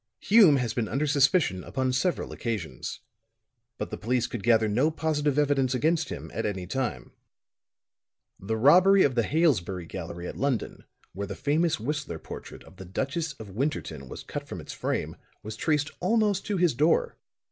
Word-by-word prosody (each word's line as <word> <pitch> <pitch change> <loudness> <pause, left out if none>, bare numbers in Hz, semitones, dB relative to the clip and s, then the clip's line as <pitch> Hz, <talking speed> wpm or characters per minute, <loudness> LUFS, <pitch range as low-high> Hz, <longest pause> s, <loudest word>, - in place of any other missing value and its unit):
"Hume 200 -8 +6
has 125 -4 -1
been 115 -2 -1
under 135 +8 -1
suspicion 140 - +2
upon 130 -1 -1
several 170 +8 0
occasions. 95 - -4 0.8
But - - -5
the - - -5
police 120 +2 0
could 120 - -5
gather 115 0 +4
no 125 +9 +2
positive 150 -3 -1
evidence 135 -3 +2
against 160 +3 +1
him, - - -7
at - - -2
any 95 -3 -3
time. 95 - -3 1.3
The 110 +4 -2
robbery 185 - +6
of 140 - +2
the 120 - +2
Hailesbury 105 - +1
gallery 85 0 -6
at - - -7
London, 135 -4 -2 0.3
when 100 +2 -4
the 100 - -5
famous 160 +1 +1
Whistler 145 - -3
portrait - - -10
of 95 - -17
the 95 - -9
Duchess 140 - -2
of 110 -6 -11
Winterton 95 - -3
was - - -8
cut - - -6
from - - -6
its - - -8
frame, - - -3 0.3
was 110 +1 -6
traced 150 +3 0
almost 210 0 +1
to 205 - 0
his 175 -3 +3
door. 150 +7 +2
130 Hz, 170 wpm, -27 LUFS, 105-155 Hz, 1.3 s, Hume